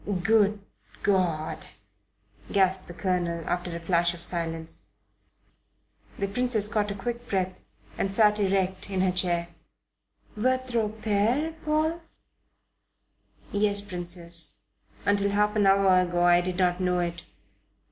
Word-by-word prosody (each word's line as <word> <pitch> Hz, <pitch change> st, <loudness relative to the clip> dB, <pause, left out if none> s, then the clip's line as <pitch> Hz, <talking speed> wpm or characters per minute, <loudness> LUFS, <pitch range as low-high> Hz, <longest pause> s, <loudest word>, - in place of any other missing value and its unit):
"Good 210 Hz, -1 st, +3 dB, 0.4 s
God!" 175 Hz, -6 st, 0 dB, 0.9 s
gasped 190 Hz, -1 st, +2 dB
the 175 Hz, -, -8 dB
Colonel, 175 Hz, -3 st, -1 dB
after 175 Hz, -1 st, -2 dB
a -, -, -4 dB
flash 170 Hz, 0 st, +1 dB
of 170 Hz, -, -12 dB
silence. 165 Hz, -2 st, -2 dB, 1.3 s
The 200 Hz, -, -1 dB
Princess 220 Hz, 0 st, 0 dB
caught 210 Hz, -1 st, 0 dB
a 200 Hz, -, -3 dB
quick 240 Hz, +4 st, -5 dB
breath 185 Hz, -1 st, -1 dB, 0.4 s
and 195 Hz, -, 0 dB
sat 210 Hz, +1 st, +4 dB
erect 190 Hz, -1 st, 0 dB
in 190 Hz, -2 st, 0 dB
her 185 Hz, -1 st, +3 dB
chair. 175 Hz, -1 st, 0 dB, 0.9 s
"Votre 245 Hz, -1 st, 0 dB
Pere, 220 Hz, +8 st, 0 dB
Paul?" 310 Hz, +2 st, 0 dB, 1.5 s
"Yes, 205 Hz, 0 st, +1 dB
Princess. 175 Hz, -3 st, -2 dB, 0.4 s
Until 200 Hz, 0 st, +3 dB
half 210 Hz, +1 st, +1 dB
an 205 Hz, -2 st, +3 dB
hour 195 Hz, -1 st, +5 dB
ago 175 Hz, -1 st, +1 dB
I 175 Hz, 0 st, +5 dB
did 180 Hz, 0 st, -3 dB
not 180 Hz, -1 st, +1 dB
know 180 Hz, -1 st, +1 dB
it. 170 Hz, -1 st, -2 dB
190 Hz, 125 wpm, -27 LUFS, 175-210 Hz, 1.5 s, hour